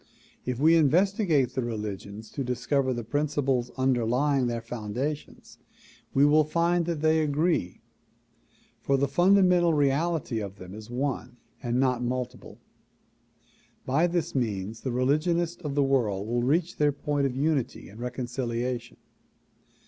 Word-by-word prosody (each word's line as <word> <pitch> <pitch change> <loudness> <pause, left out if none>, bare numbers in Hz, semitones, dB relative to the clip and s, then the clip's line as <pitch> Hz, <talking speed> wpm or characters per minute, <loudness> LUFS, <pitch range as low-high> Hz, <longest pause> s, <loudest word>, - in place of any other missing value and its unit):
If 125 -1 -2
we 160 +3 +5
investigate 165 - +3
the 130 - -1
religions 105 -2 -5
to 140 - -3
discover 130 +2 0
the 120 -2 -3
principles 140 -1 0
underlying 130 +1 +2
their 120 -1 -2
foundations 120 +6 -5 0.5
we 140 +1 +4
will 155 +1 +5
find 170 +2 +1
they 160 -1 +2
agree, 150 - 0 1.0
for 140 - +1
the 140 +1 +1
fundamental 180 +1 +4
reality 145 -2 +1
of 100 -2 -6
them 90 -1 -11
is 110 +1 -10
one 125 -1 -3 0.2
and 120 -1 -1
not 130 -2 +2
multiple. 125 0 -4 1.3
By 150 +7 +2
this 175 -1 -2
means 110 -4 -2
the 130 - -3
religionists 160 +7 0
of 145 -4 -4
the 145 - +3
world 110 -8 0
will 120 +1 0
reach 160 +8 +1
their 150 -1 +3
point 145 0 -1
of 125 - -5
unity 145 -2 -1
and 105 +4 -13
reconciliation. 120 -1 -3
135 Hz, 135 wpm, -27 LUFS, 120-155 Hz, 1.3 s, we